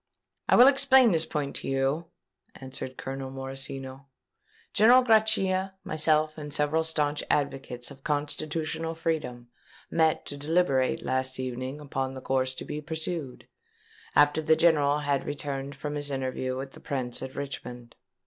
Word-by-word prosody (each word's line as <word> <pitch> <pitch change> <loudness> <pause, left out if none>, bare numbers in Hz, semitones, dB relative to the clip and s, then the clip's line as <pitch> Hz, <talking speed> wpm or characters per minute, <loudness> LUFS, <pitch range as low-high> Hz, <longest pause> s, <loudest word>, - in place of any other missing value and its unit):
"I - - +6
will 245 - +9
explain 265 -3 +6
this 160 -2 +1
point 145 -3 -3
to - - -6
you," 135 +5 0 0.5
answered 130 -1 -8
Colonel 135 0 -5
Morosino. 135 0 -6 0.7
"General 245 +5 +6
Grachia, 195 -5 +2
myself, 155 0 +1
and 150 -1 -7
several 150 +3 +1
stanch 150 -2 -1
advocates 135 -4 -1
of 135 - -14
constitutional 155 +2 -2
freedom, 155 -7 -3 0.4
met 160 -1 +2
to 145 - -6
deliberate 145 -3 +1
last 130 0 -1
evening 130 +2 -4
upon 135 -2 -3
the 130 - -7
course 130 0 0
to - - -6
be 150 0 -5
pursued, 160 -3 -4 0.7
after 145 +1 +5
the 160 0 +4
General 150 -3 +4
had 145 -2 0
returned 140 -1 -4
from 145 +2 -5
his 145 -1 -1
interview 130 -1 -2
with 135 0 -6
the - - -13
Prince 125 -3 -2
at 130 0 -7
Richmond. 125 -4 -7
145 Hz, 145 wpm, -27 LUFS, 135-160 Hz, 0.7 s, will